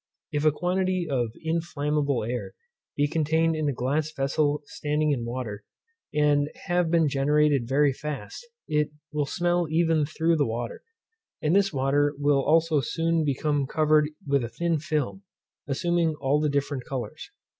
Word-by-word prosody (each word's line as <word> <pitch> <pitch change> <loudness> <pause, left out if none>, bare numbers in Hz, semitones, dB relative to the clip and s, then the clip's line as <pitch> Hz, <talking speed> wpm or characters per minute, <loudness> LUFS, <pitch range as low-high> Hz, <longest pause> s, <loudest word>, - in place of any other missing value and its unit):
If 145 0 -1
a 155 - +6
quantity 180 +2 0
of 125 -5 0
inflammable 150 -5 0
air 120 +2 -4 0.4
be 145 0 +3
contained 160 +1 +1
in 155 -2 0
a - - +1
glass 140 +5 -1
vessel 145 +1 0
standing 150 +1 -1
in 120 -5 -1
water, 115 -4 -5 0.5
and 145 -1 +2 0.2
have 175 -1 +1
been 165 -2 +3
generated 145 -2 +2
very 140 +2 +3
fast, 150 - -6 0.2
it 150 -2 +1 0.2
will 150 -1 0
smell 175 +2 0
even 160 -2 +2
through 165 +1 +1
the 145 - +2
water, 115 +1 -4 0.6
and 155 +3 +1
this 195 0 +3
water 145 +1 +1
will 145 -1 +3
also 160 -1 +3
soon 165 +5 0
become 145 0 0
covered 155 0 +3 0.2
with 140 -2 +1
a 115 - -4
thin 165 +6 -1
film, 155 +4 -2 0.5
assuming 170 +2 +1
all 140 +2 +2
the 150 0 +1
different 140 -2 -1
colours. 125 -5 -6
150 Hz, 155 wpm, -26 LUFS, 140-160 Hz, 0.6 s, a